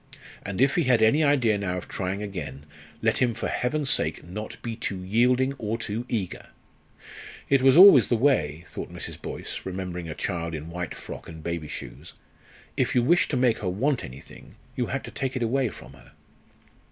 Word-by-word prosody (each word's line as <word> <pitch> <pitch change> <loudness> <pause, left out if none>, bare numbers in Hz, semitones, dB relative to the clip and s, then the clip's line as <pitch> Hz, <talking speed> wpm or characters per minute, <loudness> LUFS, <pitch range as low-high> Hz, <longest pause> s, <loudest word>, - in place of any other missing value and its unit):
And 100 0 -5
if 135 +2 +4
he 170 - +1
had 120 -3 +4
any 145 +8 +4
idea 125 -8 +3
now 90 -2 -2
of 90 - -7
trying 95 +2 -3
again, 75 -9 -6 0.4
let 110 0 +2
him, 120 -3 +2
for - - -3
Heaven's 145 +2 -1
sake, - - -1
not 105 +6 -7
be 115 -1 -3
too 100 -5 -4
yielding 125 +7 +2
or 110 0 -2
too 115 +1 -4
eager! 100 -7 -3 1.0
"It 140 -1 +4
was 135 +2 +6
always 175 - +9
the 120 - +2
way," 90 - +1
thought - - -7
Mrs. - - -7
Boyce, - - -6
remembering 90 -2 -5
a 75 - -5
child 85 -3 -3
in 80 +2 -7
white 90 -1 -4
frock - - -9
and 80 -1 -10
baby 85 -3 -3
shoes 65 -4 -9 0.6
"if - - 0
you 120 - +4
wished 175 +8 +3
to 140 - 0
make 125 -3 +2
her 95 - -2
want 125 +8 0
anything, 65 0 -12 0.2
you - - -1
had - - -3
to - - -8
take 130 -1 -3
it 125 - -1
away 125 +2 +1
from - - -12
her." - - -18
110 Hz, 195 wpm, -26 LUFS, 90-130 Hz, 1.0 s, always